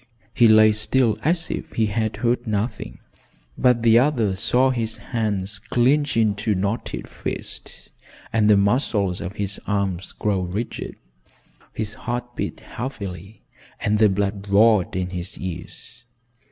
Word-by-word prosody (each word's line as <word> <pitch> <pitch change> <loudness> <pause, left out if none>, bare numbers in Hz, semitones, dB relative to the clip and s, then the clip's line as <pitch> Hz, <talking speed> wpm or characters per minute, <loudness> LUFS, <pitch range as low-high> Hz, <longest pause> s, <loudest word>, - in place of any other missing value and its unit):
He 120 -1 +5
lay 110 0 +7
still 110 +2 +1
as 165 +2 0
if - - -5
he 110 - +2
had 110 +1 -1
heard 120 +1 0
nothing, 110 +2 -3 0.6
but 125 -2 +3
the 115 0 +6
other 120 -8 +1
saw 125 +7 +2
his 115 -3 -2
hands 105 -3 -2
clinch 135 +5 +1
into 105 -1 +1
knotted 100 +5 -3
fists - - -7 0.4
and 110 -2 +3
the 105 - +6
muscles 100 -3 +1
of 95 - -5
his 100 -1 -3
arms 100 -3 -2
grow 105 -2 0
rigid. 95 +6 -4 0.8
His 110 -1 -3
heart 120 +2 -5
beat - - -4
heavily 100 - -7 0.4
and 105 0 +1
the 110 -1 +6
blood 100 +1 -2
roared 105 -2 +4
in 90 -1 -2
his 90 0 -6
ears. 90 +6 -8
105 Hz, 140 wpm, -23 LUFS, 100-120 Hz, 0.8 s, lay